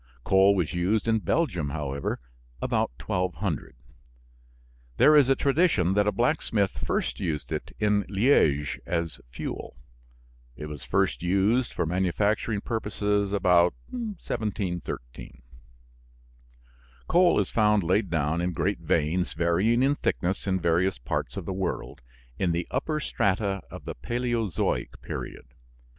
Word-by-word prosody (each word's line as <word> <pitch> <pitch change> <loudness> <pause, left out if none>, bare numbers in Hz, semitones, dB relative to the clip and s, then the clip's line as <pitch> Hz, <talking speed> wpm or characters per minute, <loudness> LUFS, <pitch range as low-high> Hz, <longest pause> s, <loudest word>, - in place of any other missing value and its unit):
Coal 95 +4 +5
was 90 -4 -1
used 95 +6 0
in 110 -1 +3
Belgium, 95 - 0
however, 70 -2 -3 0.4
about - - 0
1200. 90 -3 -2 1.2
There 155 - +6
is 140 -3 +6
a 135 - +5
tradition 140 - +2
that 105 +1 +2
a - - +3
blacksmith 115 -6 +1
first - - -2
used 75 -3 -3
it - - -4
in 105 -1 +2
Liège 95 - +2
as 85 -2 -2
fuel. - - -6 0.8
It 75 - -7
was 75 -1 -7
first - - 0
used 100 +8 +2
for - - -1
manufacturing 100 +5 0
purposes 105 -2 -1
about 90 -3 +4 0.2
1713. 100 - -5 1.6
Coal 175 -4 +4
is 100 - -1
found 105 -2 +3
laid 95 +3 +1
down 80 0 0
in 90 0 -1
great 100 +3 -1
veins, 85 +2 0
varying 90 +9 +2
in 140 +2 +4
thickness, 95 -9 -1
in 95 -1 +1
various 85 0 +1
parts - - -3
of - - -4
the 95 - -3
world 95 -8 -4 0.4
in 90 -3 +1
the 85 0 -2
upper 155 +4 -1
strata 100 -7 0
of - - -10
the - - -4
Paleozoic 120 - -2
period. - - -6
95 Hz, 130 wpm, -27 LUFS, 85-110 Hz, 1.6 s, There